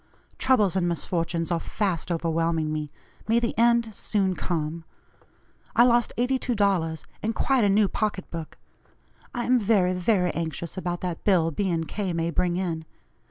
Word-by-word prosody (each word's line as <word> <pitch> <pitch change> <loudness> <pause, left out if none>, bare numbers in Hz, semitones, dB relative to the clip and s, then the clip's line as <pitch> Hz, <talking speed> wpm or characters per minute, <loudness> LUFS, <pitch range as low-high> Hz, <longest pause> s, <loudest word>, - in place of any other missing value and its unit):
Troubles 215 -8 +3
and 180 -2 +1
misfortunes 165 0 -2
are 170 - +1
fast 185 -3 -2
overwhelming 165 -1 0
me; 150 -1 -3 0.4
may 230 +1 +4
the 235 -1 -2
end 235 -1 +3
soon 195 -2 0
come. 165 -2 -3 0.9
I 235 - +7
lost 240 -1 +3
$82, 205 -10 0 0.2
and 225 +1 -1
quite 265 -4 +2
a 205 - +4
new 205 +1 +4
pocket 205 -2 -2
book. 165 -2 -7 0.8
I 240 - -1
am 250 0 +4
very, 195 -4 +3
very 180 -1 +2
anxious 165 0 -4
about 175 -2 -3
that 180 -3 -4
bill 170 -5 +3
B. 190 +4 -1
& - - -9
K. 195 -4 -3
may 165 0 -1
bring 175 +2 0
in. 170 -4 -2
185 Hz, 160 wpm, -26 LUFS, 165-215 Hz, 0.9 s, I